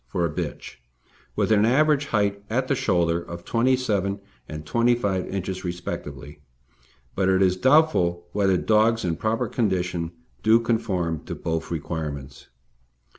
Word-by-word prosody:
for 90 -3 -1
a 85 - -2
bitch, 65 - -5 0.6
with - - 0
an 105 -1 +5
average 145 +4 +3
height 100 -3 0
at 130 +4 0
the 140 - +2
shoulder 85 -8 +1
of 85 0 -9
27 115 -5 +1
inches 100 0 -12 0.2
and 75 0 -7
25 115 0 +1
inches 95 -1 -4
respectively; 75 -5 -6 0.7
but 95 -1 +1
it 95 0 +4
is 90 -1 +3
doubtful 95 - +3
whether 95 -2 +2
dogs 110 +2 +2
in 85 -2 0
proper 110 +6 -1
condition 90 -6 -1 0.3
do 110 +2 +5
conform 100 -9 -1
to - - -6
both 80 -1 -3
requirements. 75 -4 -5
95 Hz, 140 wpm, -24 LUFS, 85-115 Hz, 0.7 s, an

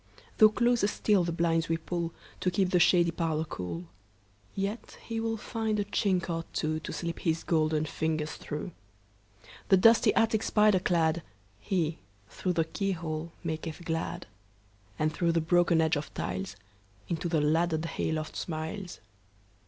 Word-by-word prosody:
Though 215 -1 +9
closer 235 -1 +2
still 205 -2 +2
the 170 - -1
blinds 165 -1 +1
we 165 - +2
pullTo 170 +2 -4
keep 185 0 +1
the 180 - +4
shady 170 -1 +5
parlour 160 -2 -1
cool, 90 - -5 0.7
Yet 200 +4 -4
he 230 -1 -3
will 225 0 -1
find 220 -1 -2
a 205 - 0
chink 190 -3 0
or 165 -2 -2
twoTo 155 0 -2
slip 170 -1 -4
his 165 -1 0
golden 155 -2 +1
fingers 155 0 -2
through. 150 +4 -6 1.0
The 190 - +7
dusty 225 +5 +6
attic 225 -1 +3
spider 210 -3 +4
cladHe, 160 - -1 0.3
through 185 - -2
the 165 -2 +1
keyhole, 170 -3 -3
maketh 160 +1 -4
glad; 165 0 -3 0.7
And 155 0 0
through 170 -1 +1
the 165 - +3
broken 170 0 +3
edge 160 +1 +2
of 145 0 -4
tiles, 95 +1 -3 0.5
Into 170 +1 -2
the 165 -2 +2
laddered 160 +2 +1
hay 165 -1 -2
loft 155 0 -3
smiles. 175 +3 -5
165 Hz, 145 wpm, -29 LUFS, 155-185 Hz, 1.0 s, Though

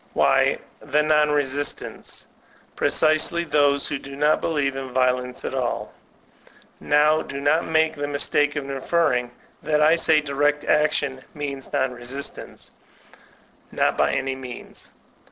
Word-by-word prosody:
Why, - - +3 0.2
the 150 +2 +1
non 150 -1 +3
resistants; 145 -1 -3 0.5
precisely 155 +2 +2
those 145 -3 +2
who 145 -2 -3
do 135 0 -10
not 150 +2 +2
believe 145 -4 0
in 135 -1 -6
violence 125 0 0
at - - -3
all - - -3 0.5
I - - -21 0.3
Now 150 +1 +3
do 140 - -6
not 145 +4 +1
make 160 0 +2
the 145 0 -3
mistake 145 +1 +1
of 145 -2 -4
infer 155 +4 +1
ring 125 -1 -1 0.3
that 150 -1 +1
I 155 +2 +5
say 160 -2 +3
direct 145 0 0
action 145 -3 +1
means 140 -2 -5
non 130 -1 0
resistance; 125 +3 -6 1.0
not - - +1
by 70 -1 +1
any 135 - -1
means. 130 -2 -9
145 Hz, 140 wpm, -23 LUFS, 135-150 Hz, 1.0 s, I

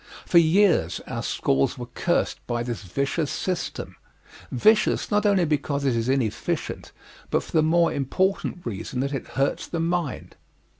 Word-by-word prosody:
For 170 - +6
years 165 - +3
our - - -4
schools 70 0 0
were - - -5
cursed - - -1
by 120 -1 -1
this 120 -2 -4
vicious 140 - -1
system 185 -2 -3 0.5
vicious 215 - +3
not 210 0 +3
only 195 -4 +3
because 145 -2 -1
it 130 -3 +2
is 115 +2 -1
inefficient 130 -5 -2 0.4
but - - +1
for - - -13
the 160 - +4
more 170 +2 +3
important 180 +6 -1
reason 115 +2 -4
that 140 +1 -2
it 135 - -4
hurts 135 +1 0
the 170 - -3
mind. 165 -3 -2
145 Hz, 155 wpm, -25 LUFS, 125-175 Hz, 0.5 s, For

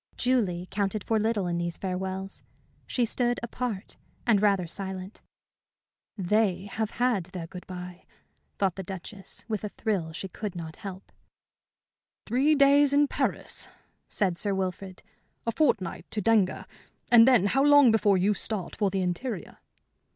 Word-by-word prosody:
Julie 200 -9 +1
counted 200 0 -1
for 220 -1 +1
little 215 -2 0
in 175 -1 -1
these 170 -1 -3
farewells. 190 +1 -4 0.5
She 245 - +1
stood 240 +1 0
apart 235 -4 -4 0.3
and 220 -4 +4
rather 200 -4 +3
silent. 190 +2 -5 1.0
"They 195 0 +1
have 215 +1 -3
had 240 -7 +1
their 180 -2 -6
good 180 +2 -10
bye," 180 -1 -8 0.5
thought 190 -2 0
the - - -3
Duchess, 190 +1 -8
with 215 -3 -3
a 210 - -3
thrill 195 -7 -2
she 170 +4 -5
could 195 +1 -6
not 160 -2 -7
help. 190 -1 -9 1.1
"Three 270 +7 +3
days 280 0 +5
in 290 0 +4
Paris?" - - -2 0.4
said 185 -5 0
Sir 200 -2 -1
Wilfrid. 190 0 -4 0.4
"A 230 - +1
fortnight 220 - 0
to 215 - -2
Denga 210 -2 +2 0.5
and 235 0 +8
then 245 -7 +5
how 270 +7 +2
long 290 -4 +7
before 210 -3 +3
you 195 +3 +3
start 200 -2 -3
for 205 -2 +1
the 190 0 -1
interior?" 185 +4 -4
200 Hz, 150 wpm, -27 LUFS, 185-230 Hz, 1.1 s, and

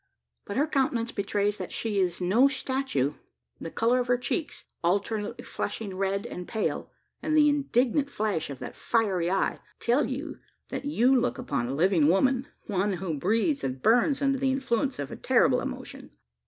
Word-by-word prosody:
But 205 - -4
her 285 - +3
countenance 260 -6 0
betrays 205 0 -1
that 185 - -5
she 215 -3 -1
is 180 -2 0
no 200 +9 +4
statue. 265 - -1 0.5
The 165 - -5
colour 235 +7 +2
of 250 - -1
her 245 0 +3
cheeks 285 +5 -3 0.2
alternately 205 +6 -1
flushing 200 -4 -4
red 195 +1 -1
and 180 - -6
pale 220 -2 -2 0.3
and 310 0 +1
the 300 -1 +6
indignant 280 -1 +2
flash 210 - -1
of 140 - -6
that - - -8
fiery 195 -7 +1
eye, 195 +1 0 0.2
tell 250 +5 +2
you 275 +5 -5 0.3
that - - -4
you 265 -2 +3
look 250 -1 +1
upon 245 - -2
a 135 - -3
living 170 -1 +3
woman 255 - +3 0.2
one 200 0 0
who 175 -3 -3
breathes 230 - +1
and 130 0 -2
burns 245 +5 +3
under 275 -1 +2
the 265 0 +2
influence 265 0 0
of 145 -1 -5
a - - -5
terrible - - +3
emotion. 60 - -7
225 Hz, 175 wpm, -27 LUFS, 190-265 Hz, 0.5 s, the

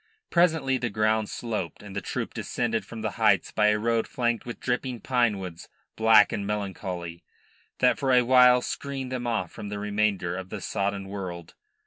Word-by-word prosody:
Presently 160 -7 +3
the 120 - -1
ground 110 0 +1
sloped, 105 -8 -4
and 100 -2 -10
the 100 - -2
troop - - -4
descended 115 -2 -2
from 115 -2 -8
the 110 - -1
heights - - +3
by 105 -1 +3
a 105 0 +3
road 115 +1 0
flanked 120 -1 -1
with 120 - -6
dripping 125 0 -2
pinewoods, 105 -9 -1 0.3
black 110 -2 +6
and 100 -1 -3
melancholy, 90 -4 -4 0.5
that 125 0 +3
for 135 -2 +1
a 125 -1 +5
while 125 0 +6
screened 135 -2 -4
them 125 -1 -3
off 100 -7 -1
from 105 - -7
the 105 - -4
remainder 100 -3 0
of 95 0 -6
the 105 - -5
sodden 100 +1 -2
world. 90 -4 -6
110 Hz, 175 wpm, -26 LUFS, 100-125 Hz, 0.5 s, black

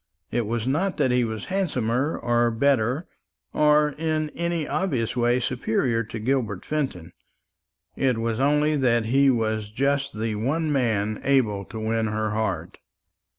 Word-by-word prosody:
It 120 -3 -1
was 115 0 -2
not 165 +9 0
that 135 -5 +2
he 125 0 +3
was 110 -2 -4
handsomer, 135 - 0
or 120 0 +2
better, 130 +4 +1 0.5
or 150 0 +4
in 155 -1 -1
any 170 -2 -2
obvious 130 - -1
way 120 0 +2
superior 120 -1 0
to 115 +1 -7
Gilbert 110 -4 -1
Fenton. 130 - -3 0.8
It 130 -3 +1
was 115 0 -1
only 150 +2 +3
that 120 -4 +2
he 135 +4 +4
was 110 -4 0
just 140 0 -1
the 110 0 -1
one 145 +9 -1
man 110 -6 0
able 110 -8 +2
to 110 - -8
win 110 0 0
her 110 0 -1
heart. 110 +1 -3
120 Hz, 150 wpm, -24 LUFS, 110-140 Hz, 0.8 s, or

